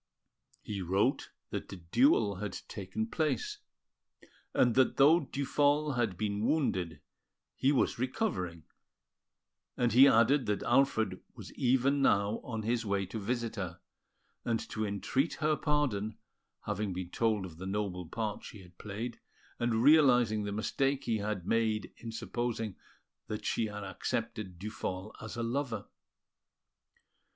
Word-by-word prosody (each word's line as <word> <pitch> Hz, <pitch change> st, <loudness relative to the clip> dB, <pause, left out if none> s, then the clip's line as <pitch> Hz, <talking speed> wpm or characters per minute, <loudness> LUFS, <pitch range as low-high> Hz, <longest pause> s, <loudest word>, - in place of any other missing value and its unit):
He 100 Hz, -2 st, -4 dB
wrote 95 Hz, +9 st, +1 dB, 0.2 s
that -, -, -4 dB
the -, -, -6 dB
duel 100 Hz, -, +3 dB
had 100 Hz, -1 st, -4 dB
taken 100 Hz, -, -4 dB
place, 230 Hz, -, -1 dB, 0.9 s
and 120 Hz, -2 st, +3 dB
that 130 Hz, +1 st, +3 dB
though 155 Hz, +5 st, +7 dB
Duphol 145 Hz, +1 st, +1 dB
had 110 Hz, -7 st, 0 dB
been 105 Hz, 0 st, -1 dB
wounded, 95 Hz, -, 0 dB, 0.5 s
he 135 Hz, -, +3 dB
was 135 Hz, -4 st, +1 dB
recovering; 95 Hz, -, -2 dB, 1.1 s
and 120 Hz, -2 st, +2 dB
he 130 Hz, +4 st, +9 dB
added 125 Hz, +1 st, +4 dB
that 105 Hz, -1 st, 0 dB
Alfred 120 Hz, -2 st, +2 dB
was -, -, -10 dB
even 130 Hz, +3 st, +2 dB
now 100 Hz, -3 st, +3 dB
on 110 Hz, -3 st, -4 dB
his 115 Hz, +1 st, 0 dB
way 100 Hz, -2 st, 0 dB
to 110 Hz, +5 st, -5 dB
visit 115 Hz, +2 st, -2 dB
her, 90 Hz, -3 st, -4 dB, 0.6 s
and 115 Hz, -1 st, 0 dB
to 110 Hz, -, -2 dB
entreat 130 Hz, +9 st, 0 dB
her 155 Hz, 0 st, +1 dB
pardon, 130 Hz, -10 st, 0 dB, 0.4 s
having 100 Hz, -1 st, -2 dB
been 90 Hz, -1 st, -5 dB
told 110 Hz, -4 st, +1 dB
of 85 Hz, -3 st, -10 dB
the 95 Hz, +2 st, -6 dB
noble 95 Hz, -3 st, -2 dB
part 105 Hz, +2 st, -3 dB
she 100 Hz, -, -10 dB
had 90 Hz, 0 st, -19 dB
played, 110 Hz, +4 st, -5 dB, 0.4 s
and 120 Hz, -1 st, +1 dB
realising 125 Hz, -8 st, +5 dB
the 100 Hz, -, -3 dB
mistake 135 Hz, +6 st, 0 dB
he 110 Hz, -2 st, 0 dB
had 100 Hz, -3 st, -3 dB
made 110 Hz, -1 st, 0 dB
in 115 Hz, -, -7 dB
supposing 115 Hz, -3 st, -3 dB, 0.5 s
that 105 Hz, -, -5 dB
she 115 Hz, -, +1 dB
had 105 Hz, 0 st, -6 dB
accepted 105 Hz, -1 st, -3 dB
Duphol 95 Hz, 0 st, -5 dB
as 110 Hz, +1 st, -7 dB
a 120 Hz, -, -1 dB
lover. 115 Hz, -3 st, -2 dB
110 Hz, 140 wpm, -32 LUFS, 100-130 Hz, 1.1 s, he